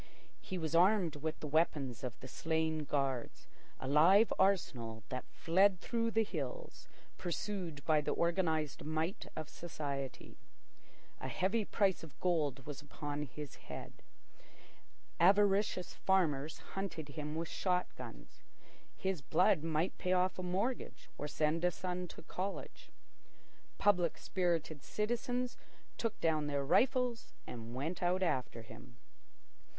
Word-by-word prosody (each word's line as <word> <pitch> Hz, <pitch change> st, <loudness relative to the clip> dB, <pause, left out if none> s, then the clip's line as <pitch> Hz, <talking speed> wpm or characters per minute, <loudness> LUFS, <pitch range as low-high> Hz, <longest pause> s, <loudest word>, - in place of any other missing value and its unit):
He 185 Hz, -, -4 dB
was 160 Hz, -2 st, -2 dB
armed 180 Hz, -2 st, +4 dB
with 155 Hz, +2 st, -3 dB
the 150 Hz, -, -3 dB
weapons 140 Hz, -5 st, +1 dB
of 125 Hz, -2 st, -4 dB
the 130 Hz, -, -7 dB
slain 160 Hz, +2 st, 0 dB
guards—a 135 Hz, -2 st, -3 dB
live 175 Hz, +10 st, +6 dB
arsenal 120 Hz, -, +1 dB
that 130 Hz, 0 st, -4 dB
fled 185 Hz, +2 st, +4 dB
through 230 Hz, +2 st, 0 dB
the 225 Hz, 0 st, +3 dB
hills -, -, -5 dB, 0.3 s
pursued 175 Hz, -4 st, -3 dB
by 155 Hz, -2 st, +4 dB
the -, -, -1 dB
organised 165 Hz, -4 st, +1 dB
might 160 Hz, +6 st, -2 dB
of 155 Hz, -2 st, -4 dB
society. 145 Hz, -5 st, -5 dB, 0.8 s
A -, -, -4 dB
heavy 200 Hz, +4 st, +1 dB
price 195 Hz, -2 st, +2 dB
of 155 Hz, -5 st, -12 dB
gold 150 Hz, -7 st, +1 dB
was 145 Hz, 0 st, -6 dB
upon 145 Hz, 0 st, -4 dB
his 145 Hz, +3 st, -7 dB, 0.2 s
head. -, -, -7 dB, 1.2 s
Avaricious 195 Hz, 0 st, +4 dB
farmers 160 Hz, -6 st, +1 dB, 0.2 s
hunted 185 Hz, -6 st, -4 dB
him 150 Hz, +1 st, -4 dB
with 165 Hz, +1 st, -2 dB
shot 180 Hz, 0 st, +1 dB
guns. -, -, -10 dB, 0.6 s
His 190 Hz, -5 st, -1 dB
blood 180 Hz, +4 st, +3 dB
might 165 Hz, +2 st, 0 dB
pay 185 Hz, -, +1 dB
off 185 Hz, 0 st, +2 dB
a -, -, -1 dB
mortgage 190 Hz, +8 st, -2 dB
or 150 Hz, -, -2 dB
send 155 Hz, +2 st, +1 dB
a 180 Hz, -, +5 dB
son 180 Hz, 0 st, -3 dB
to -, -, -11 dB
college. 190 Hz, +4 st, -5 dB, 0.9 s
Public 180 Hz, -5 st, +3 dB
spirited 165 Hz, -5 st, -1 dB
citizens 245 Hz, -, -1 dB, 0.4 s
took 230 Hz, -2 st, -1 dB
down 155 Hz, -2 st, +2 dB
their 140 Hz, -1 st, 0 dB
rifles 250 Hz, -, +2 dB
and 115 Hz, 0 st, -7 dB
went 155 Hz, +7 st, -3 dB
out 180 Hz, +1 st, +2 dB
after 125 Hz, -8 st, -1 dB
him. 120 Hz, +2 st, -13 dB
165 Hz, 130 wpm, -35 LUFS, 150-190 Hz, 1.2 s, live